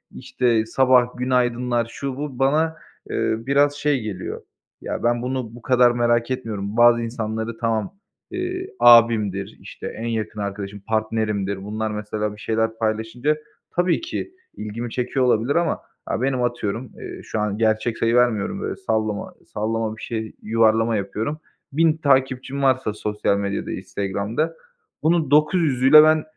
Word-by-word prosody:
işte, 115 -3 0
sabah 125 +1 +3
"Günaydınlar!", 125 -1 +1
şu, 135 -2 -4
bu... 145 -3 -5
Bana, 155 +4 +2 0.3
eee, - - 0
biraz 140 +4 +2
şey 145 -2 +1
geliyor; 100 -4 -5 0.4
ya, - - -4
ben 120 0 +2
bunu 125 -2 -3
bu 120 - -12
kadar 125 -1 +4
merak 120 0 +1
etmiyorum. 110 -4 -4
Bazı 120 0 +6
insanları 115 -1 -4
tamam, 115 - -1 0.4
eee, 365 +1 -3
abimdir, 115 -5 +5
işte, - - -8
en 115 - -5
yakın 110 -2 -3
arkadaşım, 100 0 -5
partnerimdir, 110 -3 -1
bunlar 110 +2 -3
mesela 105 0 -3
bir 105 - -14
şeyler 110 0 -1
paylaşınca 115 +7 -1 0.4
tabii 175 - +2
ki 355 +2 -5 0.2
ilgimi 110 +3 -5
çekiyor 130 +2 0
olabilir 120 +3 +2
ama, 170 -1 +1 0.2
aaa, 115 - -2
benim, 130 -1 0
atıyorum, 120 0 -2
eee, - - -8
şu 110 - -4
an 105 -1 -1
gerçek 110 +1 +1
sayı 115 +1 +1
vermiyorum, 125 - +2
böyle, - - -3
sallama 110 - -2
sallama 110 +1 -2
bir - - -12
şey, 110 -2 -4
yuvarlama 115 +1 +2
yapıyorum. 110 +9 -3 0.3
1.000 160 +1 +3
takipçim 135 -2 +1
varsa 130 -5 +2
sosyal 105 -1 -1
medyada, 100 0 -3
Instagram'da, 100 - -2 0.5
bunun 160 -3 +2
900'üyle 150 -2 +6
ben, 155 0 +4
115 Hz, 145 wpm, -22 LUFS, 110-135 Hz, 0.5 s, Bazı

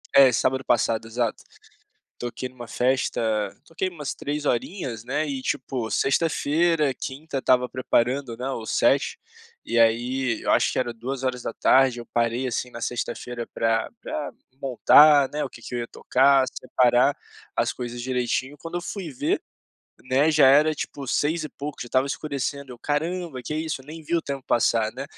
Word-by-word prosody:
é 135 -2 +8
sábado 130 +2 0
passado 115 -1 +1
exato, 115 -1 -2 0.8
toquei 120 +1 -5
numa 120 -2 -10
festa, 125 +2 0 0.4
toquei 185 +4 -3
umas 150 -5 -5
3 150 +1 -4
horinhas, 120 - -2
né, 140 +5 -1
e 135 -2 -3
tipo 125 -3 -3
sexta-feira, 155 0 +2
quinta 140 +4 -6
estava 125 -1 +3
preparando, 125 0 0
né, 125 +2 -4
o 115 -4 -5
set - - +2 0.5
e 115 - +1
aí 120 +2 +2
eu - - 0
acho - - +3
que - - -1
era 125 -2 -1
14:00 130 +1 +1
eu 120 - -8
parei, 120 +2 +1
assim, 125 +1 -2
na 115 - -8
sexta-feira 120 0 -4
pra 115 0 +1
pra 145 - -4 0.3
montar, 140 +2 +6
né, 150 0 -2
o - - -4
que - - -13
que 125 - -9
eu - - -1
ia 115 - -4
tocar, 135 +1 +3
separar 125 +2 +2 0.4
as - - +1
coisas 120 -1 -6
direitinho, 130 +2 -1
quando 165 +1 -7
eu 175 - -1
fui 180 -2 -5
ver, 125 - -1 0.6
né, 135 +5 +3
já 150 -3 +6
era 150 +4 +5
tipo 140 -2 -6
6 155 +5 0
e 155 - -4
pouco, 145 +1 -7
já - - -8
estava 130 +2 +2
escurecendo, 140 -3 -4
caramba 155 -1 -2
que 150 - -3
isso, 155 -3 -3
nem 155 +4 -10
vi 170 +3 0
o 165 - 0
tempo 140 -1 -5
passar, 115 -2 +2
né, 135 +2 -5
130 Hz, 165 wpm, -24 LUFS, 120-145 Hz, 0.8 s, é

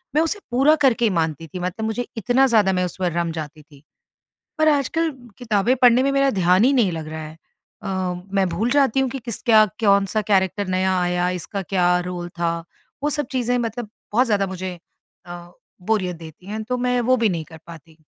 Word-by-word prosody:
मैं 310 - +4
उसे 330 +6 -1
पूरा 270 +5 +4
करके 240 -2 +3
ही 220 - +3
मानती 160 0 -2
थी, 180 +4 -7
मतलब 185 +5 -3
मुझे 225 +2 -3
इतना 245 +5 +3
ज़्यादा 210 -6 +3
मैं 180 0 +1
उस 180 - -7
पर 180 -2 0
रम 170 -1 -1
जाती 155 0 -7
थी। 145 -2 -20 0.8
पर 310 0 +4
आजकल 310 +3 +1 0.3
किताबें 230 0 +1
पढ़ने 245 +1 +6
में 275 0 +1
मेरा 275 0 +3
ध्यान 180 +4 +4
ही 265 - +4
नहीं 230 -9 +2
लग 160 -2 -5
रहा 160 0 -6
है। 155 +1 -10 0.5
अ, - - -4 0.5
मैं 195 -1 +2
भूल 200 +8 -1
जाती 275 -2 +3
हूँ 265 - +1
कि 270 - -5
किसका, 230 -2 +3 0.2
कौन-सा 200 0 +3
कैरेक्टर 195 0 +1
नया 185 +1 +1
आया, 180 0 0
इसका 200 +3 -5
क्या 180 -1 +1 0.2
रोल 175 -1 -5
था, 170 -1 +1 0.5
वो 295 - +1
सब 295 -2 -2
चीज़ें 245 -1 0
मतलब 235 -1 -4 0.2
बहुत 250 +4 +3
ज़्यादा 205 -3 +1
मुझे 185 -1 -6 0.5
अ, 175 - -8 0.6
बोरियत 185 -5 0
देती 165 +2 -13
हैं, 215 +2 -4
तो 250 +3 -2
मैं 250 0 +1
वो 255 - +6
भी 230 -3 +2
नहीं 170 -4 -2
कर 160 0 -13
पाती। 165 -1 -13
205 Hz, 205 wpm, -22 LUFS, 175-245 Hz, 0.8 s, पढ़ने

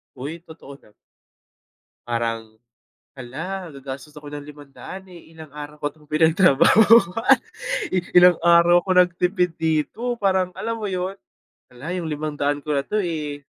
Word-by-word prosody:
Hoy, 145 +6 -7
totoo 155 -4 -13
na. 105 - -23 1.1
Parang 115 -2 -4 0.6
hala! 165 +8 -6
Gagastos 135 +1 -9
ako 145 -1 -10
ng 145 -1 -6
500, 150 +6 -11
eh, 170 -2 -15
ilang 160 -2 -12
araw 150 0 -9
ko - - -3
'tong 150 -1 -23
pinagtrabahuan. 185 - +5 0.6
I - - +2 0.2
ilang 180 -1 +7
araw 170 +1 +5
ako - - -9
nagtipid 180 0 0
dito, 165 +10 -1
parang 190 -3 +1
alam 230 0 -3
mo 215 - -5
yun? 185 +1 -3 0.6
Hala! 145 +8 -7
Yung 170 -3 -4
500 145 -1 -2
ko 150 - -2
na 140 - -1
'to, 210 0 -1
eh, 150 -5 -4
160 Hz, 140 wpm, -22 LUFS, 145-180 Hz, 1.1 s, ilang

